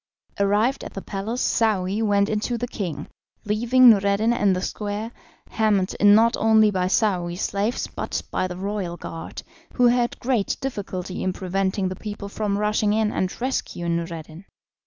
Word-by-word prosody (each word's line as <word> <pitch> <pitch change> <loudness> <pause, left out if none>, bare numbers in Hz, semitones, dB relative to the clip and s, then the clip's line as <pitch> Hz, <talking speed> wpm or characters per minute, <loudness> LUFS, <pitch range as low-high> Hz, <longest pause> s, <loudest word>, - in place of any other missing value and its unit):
Arrived 210 +6 +2
at - - -9
the 195 - -4
palace, 215 +5 -3
Saouy 205 -2 +1
went 200 -2 +2
in 215 0 0
to 240 +3 -2
the 245 +1 -3
king, 185 - -5 0.4
leaving 240 +5 +4
Noureddin 205 +1 +4
in 205 -5 +2
the 180 - -1
square, 210 +3 -4 0.4
hemmed 205 -4 +1
in 205 0 +7
not 230 +2 +4
only 220 -1 +4
by 185 -2 0
Saouy's 180 -4 0
slaves 205 +4 -1
but - - -4
by 185 - 0
the 180 -1 -7
royal 190 -3 -3
guard, 165 -1 -8 0.3
who 250 - +3
had 240 0 +2
great 240 -5 0
difficulty 195 -7 -5
in 185 - -1
preventing 190 +1 -1
the 185 - -4
people 205 0 -7
from 200 -1 -2
rushing 210 0 +1
in 215 -1 +1
and 185 -1 -2
rescuing 175 -9 -2
Noureddin. 165 +1 -7
205 Hz, 165 wpm, -23 LUFS, 185-220 Hz, 0.4 s, in